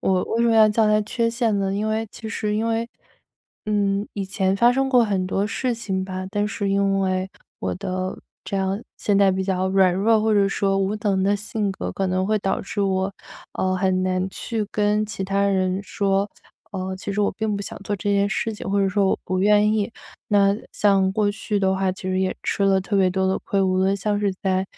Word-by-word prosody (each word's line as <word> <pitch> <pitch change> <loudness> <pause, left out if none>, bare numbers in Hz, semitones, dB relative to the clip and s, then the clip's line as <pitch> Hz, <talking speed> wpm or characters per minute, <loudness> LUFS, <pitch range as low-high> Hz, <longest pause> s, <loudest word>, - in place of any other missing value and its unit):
我 185 -1 +1
为 230 +1 0
什 235 - +3
么 225 - +3
要 215 -1 +8
叫 215 +1 +2
它 210 0 +4
缺 230 +2 -1
陷 230 -3 0
呢， 195 0 -1
因 210 +2 -1
为 220 +1 -1
其 225 - -9
实 210 -1 -2
因 225 - 0
为 230 +1 -1 0.8
嗯， 205 -1 0
以 200 - -2
前 190 0 0
发 240 +4 +5
生 270 +1 +1
过 250 -3 +5
很 195 -3 -1
多 195 +2 0
事 245 +4 -1
情 195 -5 -3
吧， 185 0 -5
但 205 0 0
是 200 -2 -2
因 195 0 +2
为 185 0 0 0.3
我 - - -2
的 185 -1 -4 0.3
这 200 - -3
样 195 +2 -1
现 200 -1 +1
在 195 -1 +5
比 190 0 -1
较 185 -1 0
软 190 -1 +4
弱， 215 +4 +3
或 220 0 +2
者 200 -1 +3
说 195 -1 0
无 195 +2 0
能 195 -3 +1
的 200 +2 +2
性 210 0 -2
格， 190 - -5
可 195 - -1
能 185 0 0
会 215 +1 +1
导 195 -1 -1
致 200 - -4
我， 190 0 0 0.4
呃， 185 0 0
很 185 -1 +1
难 185 0 0
去 220 +1 -3
跟 210 0 +1
其 210 -2 -5
他 195 +1 0
人 190 -1 +1
说， 200 0 0 0.4
呃， 190 -1 -4
其 195 +1 -5
实 210 - -1
我 200 - +1
并 220 -2 -2
不 - - -4
想 - - -7
做 205 0 -2
这 200 +2 -1
件 200 0 +2
事 225 +1 -1
情， 205 - -6
或 200 - +2
者 195 - +2
说 200 0 +2
我 - - +1
不 185 0 -1
愿 210 +1 +4
意。 215 0 0 0.4
那 200 -1 +4
像 195 -2 +2
过 210 0 +1
去 210 0 -2
的 190 -1 +2
话 190 0 0
其 185 - -9
实 185 0 -1
也 190 0 -1
吃 - - -1
了 195 -1 +4
特 200 +2 -2
别 190 -2 +3
多 190 +1 0
的 190 - +1
亏， 200 - -1
无 185 -1 +2
论 190 +1 +2
像 205 +1 -1
是 200 -2 +1
在， 190 -1 +1
200 Hz, 250 characters per minute, -23 LUFS, 190-210 Hz, 0.8 s, 要